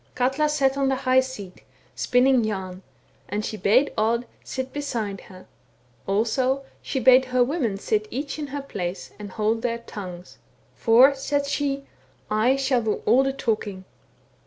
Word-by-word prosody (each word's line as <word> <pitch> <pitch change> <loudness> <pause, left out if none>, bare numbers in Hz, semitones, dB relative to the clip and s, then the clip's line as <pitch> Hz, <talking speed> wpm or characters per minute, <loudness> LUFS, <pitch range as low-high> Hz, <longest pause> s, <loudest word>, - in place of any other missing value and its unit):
*' - - -36
Katla 265 +4 +1
sat 275 -2 +1
on 270 -1 +2
the 265 - +2
high 260 0 +3
seat 215 -8 -5 0.3
spinning 250 0 +3
yam, 190 -3 -4 0.5
and 210 +2 -2
she - - -4
bade 215 +8 +3
Odd 230 +2 +1 0.2
sit 260 0 -5
beside 230 -9 -3
her; 185 0 -13 0.6
also, 255 +7 +1 0.2
she 265 - -2
bade 260 +1 +6
her 250 -1 +2
women 245 - -1
sit 215 +1 -1
each 280 +4 -4
in 295 - -3
her 280 0 -5
place, 180 -8 -5
and 205 -1 -7
hold 220 +1 0
their 235 -1 -1
tongues. 185 -6 -9 0.2
* - - -36
For,' 250 +4 +6
said 280 +1 -1
she, 280 -1 -2 0.2
* - - -32 0.2
I 265 - +5
shall 265 -2 +1
do 220 -2 -2
all 245 +5 +5
the 270 0 +1
talking.' 215 -7 -2
250 Hz, 170 wpm, -24 LUFS, 210-270 Hz, 0.6 s, bade